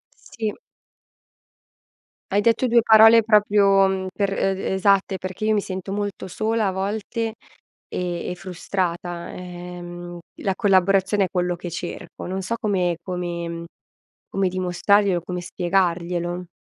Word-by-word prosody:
Sì. 220 -2 -5 1.8
Hai 200 +1 +3
detto 230 +4 +2
2 235 0 +5
parole 225 +1 +7
proprio, 205 -2 +4
mhmm, 190 0 -2
per 200 -1 0
e 195 0 +1
d - - -6
esatte, 195 0 +2
perchè 185 +3 -5
io 215 - +3
mi 210 - +2
sento 190 0 -5
molto 205 -2 -3
sola 220 +3 0
a - - +1
volte 215 +4 -3 0.5
e 175 -1 -3
e - - -4
frustrata, 175 -1 -3
ehm, 175 -1 -8 0.2
la 195 - 0
collaborazione 195 0 +3
è - - -6
quello 180 -1 0
che 175 +1 -7
cerco. 175 +1 -6
Non 190 +1 -3
so 190 +5 -2
come 180 -5 0
come 175 -1 -4
mhmm, 170 0 -5 0.7
come 195 -1 0
dimostrarglielo, 185 +1 +2
come 180 +1 -4
spiegarglielo. 175 -1 -1
190 Hz, 135 wpm, -23 LUFS, 175-205 Hz, 1.8 s, parole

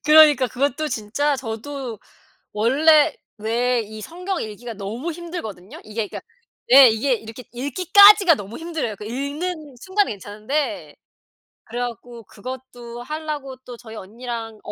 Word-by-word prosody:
그러니까 300 -4 +7
그것도 280 +4 -1
진짜 275 +7 -1
저도 245 0 -6 0.5
원래 290 +8 +4 0.2
왜 235 +3 +1
이 215 0 -9
성경 360 - -4
읽기가 225 +2 -7
너무 220 +11 -5
힘들거든요. 305 - -8
이게 215 0 -3
그러니까 - - -8 0.5
네 265 0 +9
이게 235 +4 +1
이렇게 225 +2 -8
읽기까지가 370 - +6
너무 205 -1 -8
힘들어요. 325 -10 -3
그 210 - -9
읽는 285 +5 -4
순간은 390 - +1
괜찮은데 215 +9 -4 0.7
그래 240 +2 -5
갖고 240 0 -6
그것도 240 +1 -9
하려고 300 -2 -5
또 245 - -9
저희 225 -2 -11
언니랑 225 +1 -7
250 Hz, 310 characters per minute, -22 LUFS, 225-305 Hz, 0.7 s, 네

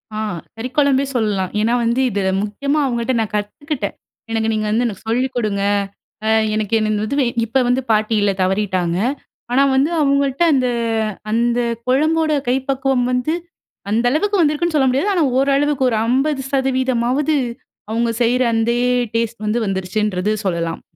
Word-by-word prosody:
ஆ, - - -3 0.4
கறிக்குழம்பே 270 +3 +1
சொல்லலாம். 205 -5 0
ஏன்னா, 230 +2 +1
வந்து 235 +3 +1
இத 200 -1 -2 0.2
முக்கியமா 280 +8 -1
அவங்கள்ட்ட 235 +1 -1
நான் 215 - -4
கத்துக்கிட்டே. 210 +2 -3 0.4
எனக்கு 225 0 0
நீங்க 215 0 -1
வந்து 235 +3 +1
எனக்கு 205 -1 -7
சொல்லிக்கொடுங்க 230 -5 0 0.6
அ - - +3 0.2
எனக்கு 215 0 -2
என்ன 215 -1 0
இது 280 - -2
வே 265 - +3 0.2
இப்ப 255 +4 +1
வந்து 250 +2 +2
பாட்டியில்ல 215 -1 +2
தவறிட்டாங்க. 185 -2 0 0.5
ஆனா 270 +3 +4
வந்து 275 +4 +3
அவுங்கள்ட்ட 280 +1 +2
அந்த 255 -2 +2 0.6
அந்த 235 +1 +1 0.3
குழம்போட 310 +4 +2 0.2
கை 250 - +3
பக்குவம் 265 -2 +1
வந்து, 250 +6 0 0.6
அந்த 230 +3 +1
அளவுக்கு 405 +6 +1
வந்திருக்குன்னு 310 +2 +1
சொல்ல 265 -3 +3
முடியாது. 285 +11 +1
ஆனா 340 -4 +2 0.2
ஓரளவுக்கு 275 -1 +2
ஒரு 225 - 0
50 265 0 0 0.6
அவுங்க 230 +1 +1
செய்ற 245 +2 +2
அந்தே 235 +2 +1 0.4
டேஸ்ட் 230 -1 -2
வந்து 220 +3 0
வந்துடுச்சின்றது 195 +1 -1
சொல்லலாம். 170 -2 -2
245 Hz, 140 wpm, -19 LUFS, 215-275 Hz, 0.6 s, ஆனா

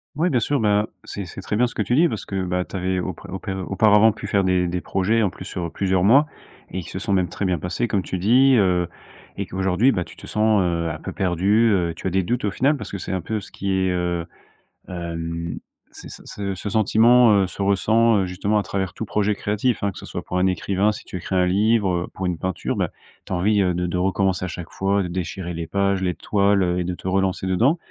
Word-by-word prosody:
Oui, 165 +5 +1
bien 125 - +3
sûr, 140 +5 0
bah, 105 -1 +2 0.2
c'est 100 - -6
c’est 90 - -9
très 105 - -3
bien, 125 +2 +3
ce - - -11
que 105 - 0
tu 120 - -1
dis, 165 +5 +5
parce 110 -9 -5
que, 95 -1 -3
bah, 90 0 -1
tu - - -10
avais 95 0 -1
aupr 90 +2 -5
aup 95 +1 -5 0.3
auparavant 105 +2 +5
pu 105 - -9
faire 100 -1 +1
des 90 -1 +2
des 90 +1 -2
projets, 110 +5 +1
en 105 - +2
plus, 95 - -10
sur 85 -4 -4
plusieurs 95 -2 0
mois 130 +9 +6 0.5
et 95 - -3
qui - - -10
se - - -5
sont 100 - -1
même 90 -3 +1
très 100 - -3
bien 90 -3 0
passés, 90 +9 -2
comme 100 -2 0
tu 95 - -4
dis, 125 +8 +5
heu. 90 -4 +2 0.5
Et - - -2
qu'aujourd'hui, 95 +7 +2
bah, 90 - -1
tu - - -14
te - - -11
sens, 110 -1 +2
heu, 85 -2 -1
un 75 - -4
peu - - -7
perdu, 100 +5 +2
heu. 85 -4 +1
Tu 85 - -5
as - - +2
des 95 +1 +1
doutes, 120 +4 -1
au 100 - 0
final, 140 +8 +2
parce - - -7
que 100 - -4
c'est 95 - -6
un 95 - -1
peu 110 +5 -3
ce - - -12
qui 100 0 -3
est, 95 -1 +1
heu, 90 -1 -1 0.6
hem, 85 -1 -5 0.3
c'est - - -11
ce - - -10
ce 100 -2 -4
ce 105 - -5
sentiment, 110 +3 +5
heu, - - -1
se 100 - -8
ressent, 105 +1 +3
justement, 95 +4 -1
à - - -1
travers 95 -1 -3
tout - - -5
projet 105 +1 0
créatif, 105 +4 -1
hein, 100 - +1
que - - -14
ce - - -10
soit - - -6
pour 90 - -3
un 95 - +3
écrivain, 95 +3 +1
si - - -9
tu 90 - -7
écris 95 - -4
un 90 -1 +3
livre, 105 +2 +2 0.2
heu, - - -14
pour 95 - -4
une 90 -2 -1
peinture, 95 0 -3
bah, - - 0 0.4
tu - - -5
as - - +1
envie, 100 +3 +2
heu, 90 -2 +2
de 90 +1 -1
de 90 - -2
recommencer 95 0 0
à - - -3
chaque 85 -1 -7
fois, 100 +1 0
de 90 - -4
déchirer 90 0 -4
les 85 -1 -5
pages, 100 -1 0
les 90 -2 -1
toiles, 100 -1 +2
heu 90 0 0
et 90 - -1
de 90 - -2
te 90 - -8
relancer 95 0 0
dedans. 115 - +2
95 Hz, 260 wpm, -22 LUFS, 90-105 Hz, 0.6 s, mois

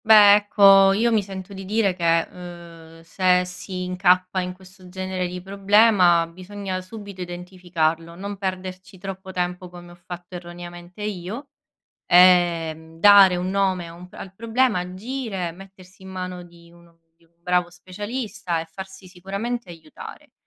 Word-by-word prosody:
Beh, 210 -2 +9
ecco, 195 -1 +6
io 230 +4 +2
mi 220 -2 +3
sento 195 0 -8
di 195 0 -8
dire 205 0 +1
che, 165 -2 +2
uhm, 170 -2 -12
se 180 +1 +2
si 180 0 -6
incappa 180 0 +2
in 180 0 -4
questo 185 0 -16
genere 185 0 -3
di 180 +1 -7
problema, 195 -3 +4
bisogna 185 +2 -6
subito 200 0 -10
identificarlo, 175 -2 -3
non 200 +3 -6
perderci 185 0 -5
troppo 190 0 -8
tempo 180 0 -3
come 175 0 -12
ho - - -14
fatto, 175 0 -9
erroneamente, 175 +2 -9
io, 210 +7 -5 0.6
ehm, 170 -3 +4
dare 200 -2 +8
un 180 +1 -2
nome 190 -2 0
a 165 - -11
un 180 +1 -13
p - - -37
al 190 -1 -10
problema, 230 0 +1
agire, 190 0 -5
mettersi 190 +1 -16
in 190 - -10
mano 185 -1 -6
di 170 -1 -17
uno 170 -1 -21 0.2
di 170 - -30
un 165 - -33
bravo 180 0 +1
specialista 205 0 -5
e 165 - -7
farsi 190 +3 -10
sicuramente 200 +4 -5
aiutare. 165 -2 -12
185 Hz, 150 wpm, -23 LUFS, 175-195 Hz, 0.6 s, Beh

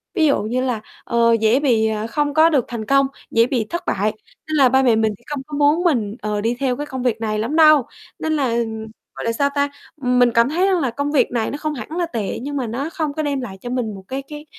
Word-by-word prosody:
ví 315 - +3
dụ 280 -8 +3
như 240 +4 -1
là, 245 -4 -1 0.2
ờ, 235 0 +3
dễ 225 +3 +3
bị, 230 -6 +2
ờ, 215 0 -2
không 290 +3 -1
có 315 +2 +6
được 275 -7 +2
thành 225 -2 -5
công, 275 +1 +3 0.2
dễ 230 0 +4
bị 245 -4 -1
thất 345 - -3
bại. 210 +3 +1 0.4
Nên 310 - -2
là 265 -3 +6
ba 265 +1 +3
mẹ 240 -4 +4
mình 220 -1 +1
thì 240 - -28
không 290 -2 -4
có 295 -1 -5
muốn 295 +4 +3
mình, 230 - +1
ờ, 210 -1 -2
đi 230 +2 0
theo 260 -2 0
cái 295 - -4
công 260 -3 -5
việc 230 -3 0
này 215 -1 -1
lắm 235 +8 -2
đâu. 305 -5 +6 0.3
Nên 315 - -1
là, 265 -6 0 0.6
gọi - - -5
là 230 - +1
sao 280 +5 +1
ta, 285 0 +1 0.3
mình 250 -1 +3
cảm 235 +3 +4
thấy 360 +5 +1
rằng 375 -2 +2
là 270 -5 0
công 285 +4 -2
việc 290 -4 +2
này 230 -2 -1
nó 285 - -4
không 305 0 -3
hẳn 245 +2 -7
là 350 - +1
tệ 230 -10 -4
nhưng 285 +2 -4
mà 255 -4 -2
nó 265 +7 -3
không 315 -4 -3
có 310 - -2
đem 280 -2 -1
lại 195 -6 -7
cho 245 - -6
mình 235 -5 -2
một 190 - -11
cái 265 +1 -4
cái 300 0 -9
260 Hz, 275 wpm, -20 LUFS, 230-295 Hz, 0.6 s, có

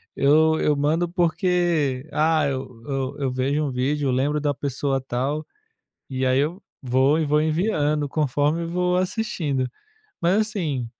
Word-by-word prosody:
eu 155 +3 +4
eu 150 -1 +2
mando 160 +4 +1
porque, 170 -5 +1
ah, 155 -1 +2
eu 130 +1 -4
eu 135 - 0
vejo 140 +4 0
um 140 - -1
vídeo, 135 +3 -1
eu 130 - +1
lembro 145 +4 +1
da 145 -1 0
pessoa 140 0 -2
tal, 135 +4 -2 0.6
e 130 -1 -2
aí 130 0 +3
eu 165 +8 -1 0.2
vou, 130 +3 +2
e 160 - 0
vou 150 +1 +2
enviando 155 -3 0
conforme 150 +3 0
vou 180 +1 0
assistindo, 170 - -1 0.5
mas 175 +4 +3
assim, 160 - -2
150 Hz, 145 wpm, -23 LUFS, 135-165 Hz, 0.6 s, eu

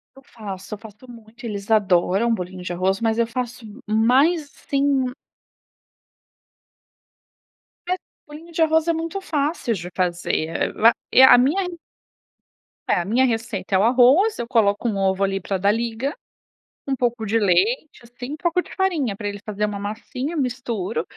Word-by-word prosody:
Eu 270 - -15
faço, 200 -5 -8
eu - - -14
faço 220 +3 -14
muito. 230 +1 -14
Eles 205 -1 -5
adoram 200 +2 +3
bolinho 185 -2 -5
de 180 - -5
arroz, 185 +3 0
mas 225 -1 +1
eu 235 - +3
faço 245 0 -5 0.2
mais 265 +9 +3
sem 275 -2 0 2.8
Mas 365 +1 0 0.3
bolinho 310 +3 -12
de 330 - -2
arroz 320 0 +3
é 335 - +3
muito 330 +4 -3
fácil 300 -6 -1
de 180 -3 -6
fazer, 175 -3 -1
eh, 165 - -1 0.2
a 235 - +7 0.2
e - - +6
a 265 - +9
minha 280 +10 +2
re 360 -1 -6 1.1
É, - - +3
a 175 - -3
minha 240 +7 +3
receita 225 -5 -2
é - - +6
o - - +3
arroz, 260 - +4
eu 235 - -4
coloco 225 -1 +2
um 205 - -2
ovo 195 0 +1
ali 195 0 0
pra 195 +1 -3
dar 200 +2 +2
liga, 235 +5 -2 0.7
um 275 - 0
pouco 240 -2 -1
de 220 +2 +1
leite, 210 - +1
assim, 245 +3 -8
um - - -6
pouco 350 +1 +1
de - - -15
farinha 325 - 0
pra 205 0 -5
ele 205 0 -5
fazer 210 -1 -2
uma 205 -1 -4
massinha, 250 +9 -5
misturo, 240 -7 -2
230 Hz, 170 wpm, -22 LUFS, 200-275 Hz, 2.8 s, a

